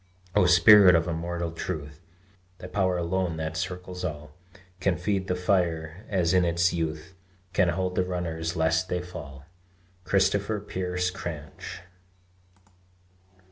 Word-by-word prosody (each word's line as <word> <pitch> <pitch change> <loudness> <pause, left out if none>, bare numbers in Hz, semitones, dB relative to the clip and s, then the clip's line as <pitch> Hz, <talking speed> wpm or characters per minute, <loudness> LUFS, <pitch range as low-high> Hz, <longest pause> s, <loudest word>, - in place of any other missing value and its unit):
O 100 -3 +5
Spirit 90 +1 +8
of 80 0 +2
immortal 85 0 -3
truth, 75 -2 -6 0.6
Thy - - -10
power 95 -1 0
alone 85 -1 -1
that 80 0 -4
circles 90 +1 -5
all 75 -3 -5 0.5
Can 95 -2 +1
feed 95 +1 -1
the 90 - 0
fire 90 0 -1
as 90 -3 +1
in 90 -1 +4
its 85 0 +2
youth 80 +1 -3 0.4
Can 90 -1 +3
hold 90 +1 -1
the 90 - +1
runners 85 -2 -3
lest 80 +2 +1
they 90 0 -1
fall! 70 -6 -9 0.6
CHRISTOPHER 100 +3 +1
PEARSE 90 -2 -2
CRANCH. 80 -3 -7
90 Hz, 130 wpm, -27 LUFS, 80-95 Hz, 0.6 s, Spirit